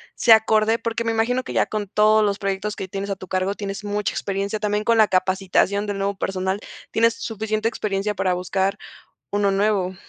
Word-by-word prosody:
sea 225 -2 +7
acorde. 220 +1 +2
Porque 230 0 -2
me 225 - 0
imagino 245 +3 +1
que - - -7
ya - - +2
con 210 -2 -3
todos 215 +2 +4
los 200 -1 -1
proyectos 200 +1 -2
que 190 - -5
tienes 195 +2 -5
a - - -1
tu 185 0 -11
cargo, 185 +2 -1
tienes 200 0 -5
mucha 205 0 -1
experiencia. 200 +2 -2
También 210 0 -1
con 230 -1 +3
la 215 - +6
capacitación 190 +2 +1
del 200 -1 -3
nuevo 200 +1 -1
personal, 190 +1 -2 0.3
tienes 230 0 +3
suficiente 220 0 -2
experiencia 210 -2 -2
para 190 -1 +1
buscar 190 +2 -1 0.5
uno 205 -1 +2
nuevo. 195 -2 +1
205 Hz, 195 wpm, -22 LUFS, 195-215 Hz, 0.5 s, sea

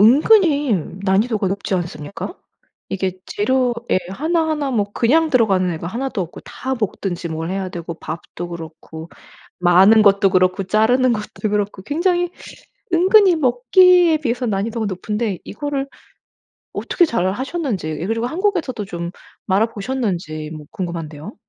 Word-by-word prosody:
은근히 290 - +5 0.3
난이도가 200 +1 +1
높지 195 0 -2
않습니까? 175 - -5 0.5
이게 190 -1 -1
재료에 240 -1 0
1 320 - 0
1 295 -3 -1
뭐 210 -5 +1
그냥 315 +7 +2
들어가는 195 -8 +3
애가 165 +1 -6
1 250 +8 -3
도 210 - -4
없고 175 - -9
다 265 +1 -4
볶든지 185 -6 -3
뭘 160 +1 -4
해야 190 0 -2
되고 170 -2 -6
밥도 170 +2 -7
그렇고 160 -1 -9 0.5
마는 190 +5 +6
것도 200 -1 +4
그렇고 185 +1 +2
자르는 240 +5 +3
것도 215 0 -4
그렇고 205 -2 -2
굉장히 350 - 0 0.6
은근히 370 +1 +5
먹기에 315 +6 +5
비해서 245 -3 -2
난이도가 215 +2 -1
높은데 205 +1 -2
이거를 275 +3 -4 0.9
어떻게 350 - +2
잘 190 - 0
하셨는지 250 - -3
그리고 225 +2 -1
한국에서도 330 - -1
좀 170 -2 -5 0.4
말아 205 +3 +3
보셨는지 195 -10 -3
뭐 150 -1 -10
궁금한데요. 170 0 -6
215 Hz, 305 characters per minute, -20 LUFS, 185-270 Hz, 0.9 s, 마는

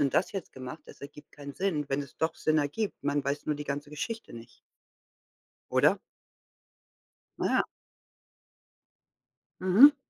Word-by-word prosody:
und 140 -2 +3
das 190 - +3
jetzt 195 -4 -5
gemacht?" 130 -1 -7
Das - - -13
ergibt 145 +1 -11
keinen 140 -1 -8
Sinn. 155 -6 0
Wenn 140 +1 +1
es 140 - -12
doch 160 0 +1
Sinn 155 0 +2
ergibt, 150 +6 -1
man 145 0 +2
weiß 140 +1 -1
nur 150 - +2
die 145 0 -5
ganze 145 +1 -3
Geschichte 225 +10 -4
nicht. 115 0 -11 1.1
Oder? - - +5 1.4
Ja. - - +3 2.0
Mhm. 220 +11 +9
145 Hz, 135 wpm, -30 LUFS, 140-180 Hz, 2.0 s, Mhm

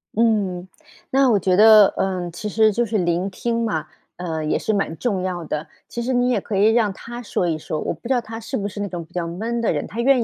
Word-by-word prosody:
嗯， 205 -5 +1 0.4
那 270 0 +4
我 210 - +4
觉 185 0 +2
得， 215 0 +8
呃， 185 -2 -1
其 170 +5 -6
实 215 +1 +3
就 235 +4 0
是 220 -1 -1
聆 175 +1 0
听 230 +4 -1
嘛， 160 -9 -2 0.3
呃， 165 -3 -3
也 150 - 0
是 - - -1
蛮 195 -6 -1
重 200 -7 -1
要 180 -2 -3
的。 150 0 -4 0.2
其 235 - -5
实 260 +2 -1
你 245 0 +2
也 250 - +2
可 215 - -5
以 200 +2 +4
让 225 -3 +2
他 240 +5 -8
说 185 -5 -1
一 160 -2 0
说， 155 0 -4
我 - - -2
不 165 - -10
知 265 - +2
道 245 - +1
他 225 -1 -8
是 225 - -5
不 200 - -1
是 205 - -8
那 205 - -2
种 175 -3 -5
比 165 - -21
较 175 -1 -2
闷 220 +8 -3
的 230 - +1
人， - - -3
他 225 - -7
愿 260 -1 +4
205 Hz, 280 characters per minute, -22 LUFS, 175-230 Hz, 0.4 s, 得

